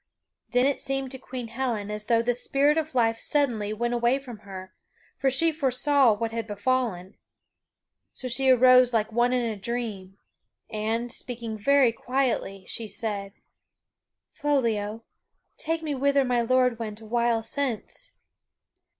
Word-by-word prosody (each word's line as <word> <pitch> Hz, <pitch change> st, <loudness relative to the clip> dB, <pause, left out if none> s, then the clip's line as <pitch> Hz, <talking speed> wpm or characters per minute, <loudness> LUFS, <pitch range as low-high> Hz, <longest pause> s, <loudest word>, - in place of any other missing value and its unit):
Then 250 Hz, +1 st, +3 dB
it 280 Hz, 0 st, 0 dB
seemed 270 Hz, -1 st, -2 dB
to 265 Hz, -, -6 dB
Queen 250 Hz, -3 st, -7 dB
Helen 230 Hz, -4 st, -2 dB
as 210 Hz, 0 st, -5 dB
though 230 Hz, +1 st, +3 dB
the 245 Hz, +1 st, +1 dB
spirit 275 Hz, +4 st, +2 dB
of 315 Hz, -3 st, -2 dB
life 225 Hz, -2 st, +2 dB
suddenly 240 Hz, -9 st, 0 dB
went 240 Hz, +3 st, -1 dB
away 240 Hz, +2 st, +2 dB
from 250 Hz, -6 st, -10 dB
her, 190 Hz, -1 st, -10 dB, 0.5 s
for 270 Hz, -, +3 dB
she 325 Hz, +6 st, +2 dB
foresaw 275 Hz, -3 st, +3 dB
what 225 Hz, +2 st, -3 dB
had 225 Hz, -1 st, -4 dB
befallen. 205 Hz, -3 st, -1 dB, 0.9 s
So 255 Hz, -, -7 dB
she 260 Hz, +2 st, +2 dB
arose 255 Hz, -1 st, +6 dB
like 220 Hz, 0 st, +1 dB
one 240 Hz, +2 st, +2 dB
in 250 Hz, -1 st, +1 dB
a 225 Hz, -2 st, -2 dB
dream, 205 Hz, -3 st, -5 dB, 0.5 s
and, 225 Hz, +2 st, -2 dB
speaking 235 Hz, -3 st, -4 dB
very 265 Hz, +3 st, +4 dB
quietly, 235 Hz, -6 st, -2 dB
she 225 Hz, -, -6 dB
said: 200 Hz, -1 st, -4 dB, 1.0 s
"Foliot, 230 Hz, -7 st, 0 dB, 0.6 s
take 325 Hz, +1 st, -2 dB
me 300 Hz, -2 st, -2 dB
whither 280 Hz, 0 st, +2 dB
my 245 Hz, -1 st, +1 dB
lord 250 Hz, 0 st, +2 dB
went 215 Hz, -2 st, -5 dB
awhile 230 Hz, +1 st, 0 dB
since!" 280 Hz, -, -4 dB
240 Hz, 145 wpm, -26 LUFS, 220-265 Hz, 1.0 s, arose